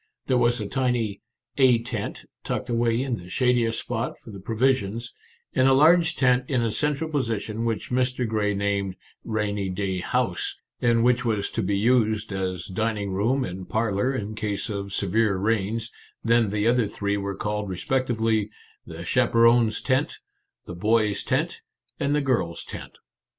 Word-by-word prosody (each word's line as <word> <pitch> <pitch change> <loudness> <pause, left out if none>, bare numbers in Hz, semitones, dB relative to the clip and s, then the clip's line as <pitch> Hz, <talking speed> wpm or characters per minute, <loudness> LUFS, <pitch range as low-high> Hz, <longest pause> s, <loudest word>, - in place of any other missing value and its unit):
There 130 - +1
was 120 0 +3
a 105 - -3
tiny 120 -4 -1 0.2
" 120 0 -44
A 120 - +5
tent 120 - -5
" - - -62
tucked - - -3
away 115 +1 +1
in 130 -4 -2
the 90 -1 -11
shadiest 120 -1 +2
spot 120 0 -3
for 115 - -13
the 100 - -9
pro 110 +4 -5
visions, 120 -2 0 0.4
and 130 0 +4
a 135 - +6
large 160 +4 +5
tent 125 -1 +3
in 125 -3 +1
a 115 - 0
central 150 +6 0
position 115 -6 -2
which 115 +1 -2
Mr. 125 -1 +1
Grey 105 -2 0
named 100 -1 -1 0.2
" - - -54
Rainy 100 -2 -1
Day 95 0 -2
House," 85 - -1 0.3
and 115 -1 +3
which 125 +1 +3
was 105 -4 -1
to 115 - -1
be 100 0 0
used 110 -1 +2
as 95 -2 -3
dining 105 0 -2
room 115 +8 +1
and 90 0 -7
parlour 110 +2 +1
in 105 -3 -4
case 105 0 -3
of 100 -1 -4
severe 100 +2 +1
rains; 110 +3 -1 0.3
then 115 -2 +3
the 105 +1 -1
other 120 -1 +3
three 100 0 -2
were 100 0 -3
called 105 0 -3
respectively, 110 +1 0 0.2
" - - -32
The 85 +1 -7
Chaper 115 +4 +3
ons' 115 -2 +4
Tent," 130 +2 0 0.5
"The - - -7
Boys' 105 +3 +1
Tent," - - -1 0.4
and 140 +1 +1
"The 150 - +2
Girls' 95 -12 -1
Tent." - - -9
115 Hz, 175 wpm, -25 LUFS, 100-125 Hz, 0.5 s, a